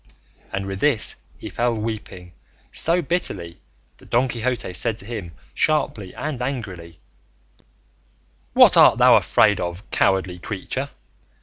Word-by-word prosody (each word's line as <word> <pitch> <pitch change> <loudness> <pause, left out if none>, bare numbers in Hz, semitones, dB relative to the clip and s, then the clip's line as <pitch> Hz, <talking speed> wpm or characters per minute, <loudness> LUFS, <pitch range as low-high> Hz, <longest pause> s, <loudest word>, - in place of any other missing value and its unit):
And 95 0 -3
with 95 -1 -5
this 125 -3 +1 0.2
he - - -9
fell 120 0 -1
weeping 105 -5 -6 0.4
so 170 +2 +2
bitterly, 95 - -3 0.4
that - - -17
Don 125 +3 +2
Quixote 120 -5 -2
said 115 +4 -1
to 100 - -9
him, 105 -7 -6 0.2
sharply 110 -11 0
and 145 -5 -4
angrily, 95 - -5 1.6
"What - - +7
art - - +7
thou - - +6
afraid 105 -2 +3
of, 85 +3 -5
cowardly 95 -2 +1
creature? - - -5
110 Hz, 125 wpm, -22 LUFS, 90-125 Hz, 1.6 s, What